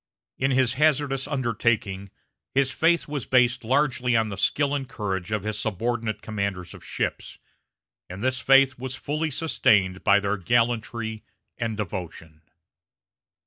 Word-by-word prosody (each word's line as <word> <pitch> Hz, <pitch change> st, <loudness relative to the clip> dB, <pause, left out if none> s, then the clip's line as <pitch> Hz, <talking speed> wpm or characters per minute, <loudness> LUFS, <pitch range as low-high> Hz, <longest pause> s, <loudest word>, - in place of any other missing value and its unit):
In 135 Hz, -, +2 dB
his 130 Hz, -2 st, +2 dB
hazardous 145 Hz, -3 st, +2 dB
undertaking 115 Hz, -7 st, -1 dB, 0.5 s
his 135 Hz, -1 st, +3 dB
faith 165 Hz, +6 st, +2 dB
was 145 Hz, -4 st, -4 dB
based 125 Hz, -1 st, +3 dB
largely 130 Hz, -1 st, +1 dB
on 110 Hz, -1 st, +1 dB
the 100 Hz, -, -5 dB
skill 140 Hz, +8 st, +1 dB
and 135 Hz, -2 st, -3 dB
courage 100 Hz, -4 st, -4 dB
of 105 Hz, -2 st, -1 dB
his 105 Hz, 0 st, -3 dB
subordinate 110 Hz, +1 st, -2 dB
commanders 100 Hz, -5 st, -3 dB
of -, -, -13 dB
ships, -, -, -4 dB, 0.7 s
and 95 Hz, +4 st, -7 dB
this 130 Hz, -1 st, +1 dB
faith 135 Hz, -1 st, +4 dB
was 130 Hz, 0 st, -5 dB
fully 150 Hz, +4 st, -2 dB
sustained 105 Hz, -, +1 dB
by 100 Hz, 0 st, +5 dB
their 100 Hz, 0 st, -1 dB
gallantry 110 Hz, +1 st, -1 dB, 0.4 s
and 115 Hz, -2 st, -2 dB
devotion. 85 Hz, -5 st, -6 dB
115 Hz, 140 wpm, -25 LUFS, 100-130 Hz, 0.7 s, by